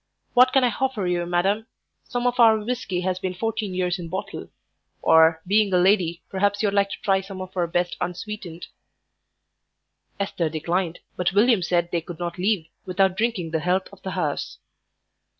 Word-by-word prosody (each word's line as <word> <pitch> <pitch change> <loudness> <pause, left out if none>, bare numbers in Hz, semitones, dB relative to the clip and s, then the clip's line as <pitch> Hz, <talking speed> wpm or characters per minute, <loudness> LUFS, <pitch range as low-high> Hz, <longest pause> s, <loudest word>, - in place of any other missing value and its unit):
What 255 +1 +6
can 270 - +4
I 250 - +4
hoffer 260 -5 -1
you, 175 -1 -1
madam? 195 +6 0 0.4
Some 245 0 -3
of 245 0 0
our 225 -2 +7
whisky 215 -5 -3
has 185 0 -1
been 185 -1 -3
fourteen 215 -1 -2
years 180 0 0
in 170 -1 -6
bottle; 190 +3 -5 0.6
or, 160 0 +5
being 205 +1 +3
a 180 - +4
lady, 180 -2 +2
perhaps 205 +2 0
you'd 200 -2 +1
like 200 -1 +2
to - - -6
try 195 -1 +2
some 195 0 -9
of 185 0 -8
our 175 -2 +1
best 175 +1 -1
unsweetened." 180 -1 -5 1.5
Esther 185 -5 -1
declined, 170 +2 -2 0.2
but 180 +1 0
William 220 0 +4
said 175 0 0
they 170 - 0
could 165 0 -9
not 175 +1 -5
leave 190 -3 +1 0.2
without 190 0 +1
drinking 205 -6 -1
the 160 - 0
health 180 +4 0
of - - -15
the 190 - -5
house. 150 -5 -2
185 Hz, 180 wpm, -24 LUFS, 175-210 Hz, 1.5 s, our